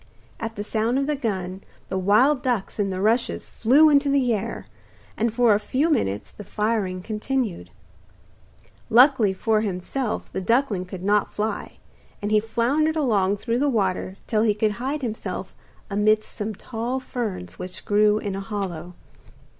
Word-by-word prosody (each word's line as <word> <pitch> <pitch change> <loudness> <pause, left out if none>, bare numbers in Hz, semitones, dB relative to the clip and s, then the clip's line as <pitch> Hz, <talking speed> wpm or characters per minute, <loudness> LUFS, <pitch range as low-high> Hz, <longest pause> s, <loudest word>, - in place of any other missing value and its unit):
At 225 0 -4
the 205 - -4
sound 225 +4 0
of 275 - +1
the 300 +1 0
gun 190 -7 -3 0.3
the 190 - -2
wild 245 +9 +4
ducks 240 -5 -2
in 200 -1 +1
the 185 -1 -3
rushes 230 +4 +1
flew 275 +8 +5
into 285 0 +4
the 265 -4 +2
air, 205 - -4 0.5
and 230 +1 0
for 235 -1 +4
a 205 - +2
few 285 +9 0
minutes 100 - -1
the 205 - -10
firing 205 -3 -1
continued. 215 - -2 1.2
Luckily 245 -3 +6
for 215 +3 +1
himself 215 +5 -3
the - - -2
duckling 230 -3 +1
could 180 0 -8
not 205 +1 +2
fly, 215 +1 -3 0.4
and 205 +1 -3
he 215 - +5
floundered 255 +9 +1
along 205 -9 +2
through 235 +3 -1
the 290 +1 +2
water 190 -4 -1
till 215 -2 +1
he 215 -2 +3
could 215 0 +1
hide 275 +3 -2
himself 220 -3 -4 0.3
amidst 215 +1 +1
some 215 -1 -4
tall 240 +5 -3
ferns 210 - -5
which 180 0 -7
grew 210 0 +4
in 205 -2 -3
a - - -3
hollow. 185 -4 -5
215 Hz, 160 wpm, -24 LUFS, 195-245 Hz, 1.2 s, Luckily